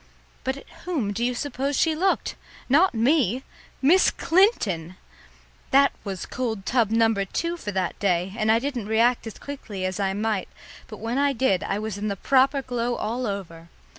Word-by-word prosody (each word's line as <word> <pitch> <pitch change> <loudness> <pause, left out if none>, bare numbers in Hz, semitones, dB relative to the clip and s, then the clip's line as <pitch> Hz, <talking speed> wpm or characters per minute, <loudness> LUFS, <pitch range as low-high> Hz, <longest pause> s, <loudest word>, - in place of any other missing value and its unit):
But 265 +1 -2
at - - -13 0.2
whom 275 - -1
do 230 +4 -2
you 245 +1 0
suppose 275 +1 -2
she 320 - +3
looked? 370 +5 0 0.3
Not 305 +3 +4
me! 255 - +2 0.4
Miss 350 +8 +6
Clinton! 205 - +1 0.7
That 275 +1 +5
was 195 -3 -5
cold 225 -6 -3
tub 235 -4 +2
number 225 -2 +2
two 335 - -2
for 210 -12 -5
that 185 -2 -2
day, 185 -1 0
and 220 -1 +2
I 225 - +5
didn't 245 -4 -3
react 230 +2 +2
as 220 - -8
quickly 215 -9 -6
as 185 +1 -3
I 195 -1 0
might, 210 -1 -1 0.4
but 215 - -9
when 230 +5 -2
I 285 0 +3
did 235 -8 +1
I 200 - -1
was 215 -1 -4
in 210 - -2
the 200 - -1
proper 270 +5 +3
glow 245 -1 -2
all 240 +3 -2
over. 170 -5 -6
230 Hz, 180 wpm, -25 LUFS, 200-275 Hz, 0.7 s, Miss